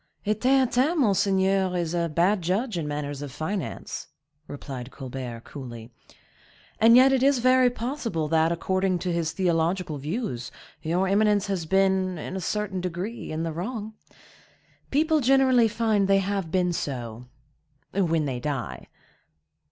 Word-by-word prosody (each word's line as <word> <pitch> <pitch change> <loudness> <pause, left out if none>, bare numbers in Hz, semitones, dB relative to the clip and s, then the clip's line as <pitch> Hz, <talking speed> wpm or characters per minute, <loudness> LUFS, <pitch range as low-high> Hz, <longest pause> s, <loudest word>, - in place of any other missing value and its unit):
"A 210 - +2
Theatin, 260 - +2
monseigneur, 195 -4 +2
is 170 -1 -2
a 170 -1 0
bad 180 +6 +2
judge 195 +7 -1
in 165 -3 -2
matters 145 -1 -4
of 145 -2 -6
finance," 160 +4 -4 0.4
replied 135 -3 -7
Colbert, 130 -3 -7
coolly. 120 -4 -9 0.9
"And 230 +2 +7
yet 265 +2 +7
it 265 - +2
is 275 0 +4
very 255 +1 +4
possible 235 - -3
that, 160 +1 +3
according 185 +2 0
to 175 0 -2
his 165 -2 -1
theological 170 -3 0
views, 145 - -4 0.3
your 175 +4 0
eminence 205 0 +3
has 190 -5 -3
been, 190 0 +2
in 170 - -6
a 190 - -3
certain 195 0 -2
degree, 180 +6 -5
in 155 +1 -2
the 165 -1 -3
wrong. 215 +5 -5 1.0
People 310 +2 +2
generally 260 -2 +4
find 215 -3 +1
they 195 0 +4
have 195 -2 -1
been 180 0 +1
so,—when 140 - -4
they 130 -3 -3
die." 135 -1 -4
185 Hz, 140 wpm, -26 LUFS, 155-215 Hz, 1.0 s, And